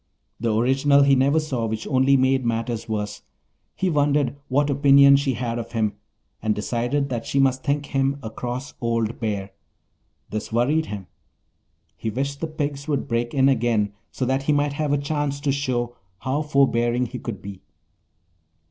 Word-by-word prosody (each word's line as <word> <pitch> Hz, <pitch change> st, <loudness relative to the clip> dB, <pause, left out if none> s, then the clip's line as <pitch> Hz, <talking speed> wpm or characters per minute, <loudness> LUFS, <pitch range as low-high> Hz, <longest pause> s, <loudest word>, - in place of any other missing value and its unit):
The 115 Hz, 0 st, 0 dB
original 135 Hz, +5 st, +4 dB
he 140 Hz, 0 st, +5 dB
never 140 Hz, +4 st, +3 dB
saw, 130 Hz, -7 st, -2 dB
which 110 Hz, 0 st, -4 dB
only 135 Hz, 0 st, +3 dB
made 130 Hz, 0 st, +2 dB
matters 115 Hz, -1 st, -2 dB
worse. 105 Hz, -1 st, -3 dB, 0.5 s
He 190 Hz, -, -1 dB
wondered 145 Hz, -3 st, +2 dB
what 140 Hz, +2 st, +2 dB
opinion 140 Hz, 0 st, +6 dB
she 140 Hz, -2 st, +1 dB
had 120 Hz, 0 st, -2 dB
of 115 Hz, -, -7 dB
him 110 Hz, -2 st, 0 dB, 0.5 s
and 110 Hz, -1 st, 0 dB
decided 120 Hz, +6 st, -1 dB
that 120 Hz, -3 st, -4 dB
she -, -, -1 dB
must 130 Hz, -1 st, +2 dB
think 145 Hz, 0 st, 0 dB
him 135 Hz, 0 st, 0 dB
a 110 Hz, -, -5 dB
cross 125 Hz, +5 st, -5 dB
old 115 Hz, -1 st, -1 dB
bear. 100 Hz, -4 st, -3 dB, 0.8 s
This 110 Hz, +1 st, -4 dB
worried 140 Hz, +8 st, +1 dB
him. 100 Hz, -3 st, -6 dB, 0.9 s
He 110 Hz, -, -4 dB
wished 140 Hz, +5 st, -3 dB
the 165 Hz, -, -2 dB
pigs 145 Hz, -2 st, -4 dB
would 145 Hz, -2 st, -1 dB
break 120 Hz, 0 st, -1 dB
in 135 Hz, -1 st, +4 dB
again 115 Hz, -5 st, +1 dB, 0.2 s
so 130 Hz, -, -2 dB
that 135 Hz, +2 st, +1 dB
he 140 Hz, -, 0 dB
might 145 Hz, 0 st, +1 dB
have 150 Hz, 0 st, -1 dB
a 145 Hz, -, +3 dB
chance 140 Hz, 0 st, -2 dB
to 140 Hz, -, +1 dB
show 125 Hz, -3 st, -1 dB, 0.3 s
how 135 Hz, +3 st, -1 dB
forbearing 125 Hz, -5 st, +2 dB
he 125 Hz, +1 st, -6 dB
could 110 Hz, -6 st, -5 dB
be. 100 Hz, -1 st, -9 dB
130 Hz, 175 wpm, -23 LUFS, 115-140 Hz, 0.9 s, opinion